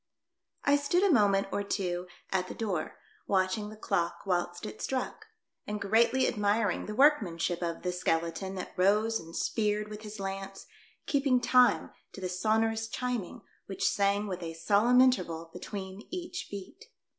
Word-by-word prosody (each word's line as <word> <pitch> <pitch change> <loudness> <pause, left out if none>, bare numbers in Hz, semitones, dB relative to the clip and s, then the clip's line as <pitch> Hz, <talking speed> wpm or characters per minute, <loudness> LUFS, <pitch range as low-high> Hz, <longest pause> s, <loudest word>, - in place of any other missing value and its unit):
I 285 0 +4
STOOD 315 +6 +1
a 400 - +5
moment 200 -4 +4
or - - 0
two 180 -3 -2 0.2
at 185 -1 0
the - - -7
door 195 -8 -3 0.3
watch 185 -1 +2
ing 210 -1 -5
the 215 - -9
clock 175 -5 -1
whilst 175 0 -1
it - - -8
struck, 265 +11 -3 0.4
and 210 0 -3
greatly 230 +6 +3
admiring 210 0 +1
the 210 - -4
workmanship 195 - +3
of 170 -1 -3
the 180 - 0
skeleton 175 +1 -1
that 185 - -6
rose 210 +4 +3
and 165 +1 -11
speared 210 -1 0
with 210 0 -8
his 215 -1 -8
lance, 195 0 -5 0.4
keeping 275 -3 +2
time 250 0 +4 0.2
to - - -9
the 185 -1 -3
sonorous 220 +4 +1
chiming, 245 -6 -3 0.2
which 195 - -1
sang 200 +1 +2
with 185 -3 -4
a 165 -1 -5
solemn 210 +9 +4
interval 170 -10 +1
between 190 +2 -7
each 355 -1 -5
beat. 200 - -9
205 Hz, 160 wpm, -30 LUFS, 185-225 Hz, 0.4 s, a